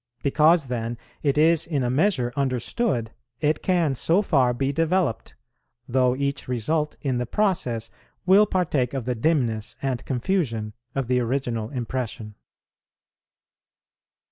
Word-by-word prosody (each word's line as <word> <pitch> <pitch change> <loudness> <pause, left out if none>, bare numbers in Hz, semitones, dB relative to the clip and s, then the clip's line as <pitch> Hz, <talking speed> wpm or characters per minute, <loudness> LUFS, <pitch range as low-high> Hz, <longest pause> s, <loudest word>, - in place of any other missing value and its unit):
Because 155 +3 +4
then 120 -2 -3 0.2
it 140 -1 +1
is 160 +1 +4
in 145 -6 0
a 120 - 0
measure 130 -5 +1
understood, 130 - -1 0.3
it 150 0 +1
can 175 -6 +2
so 170 +9 +2
far 135 -9 +3
be 135 +3 -1
developed, 165 -4 0 0.5
though 125 0 +2
each 140 +1 -2
result 150 +6 -1
in 130 -4 -1
the 125 - -2
process 125 - 0 0.3
will 200 +3 +6
partake 150 - 0
of 130 -4 -3
the 125 - 0
dimness 120 -5 0
and 130 -3 -2
confusion 125 - -1 0.2
of 135 -3 -1
the 125 0 +2
original 120 -3 -2
impression. 120 -3 -4
135 Hz, 130 wpm, -24 LUFS, 120-160 Hz, 0.5 s, will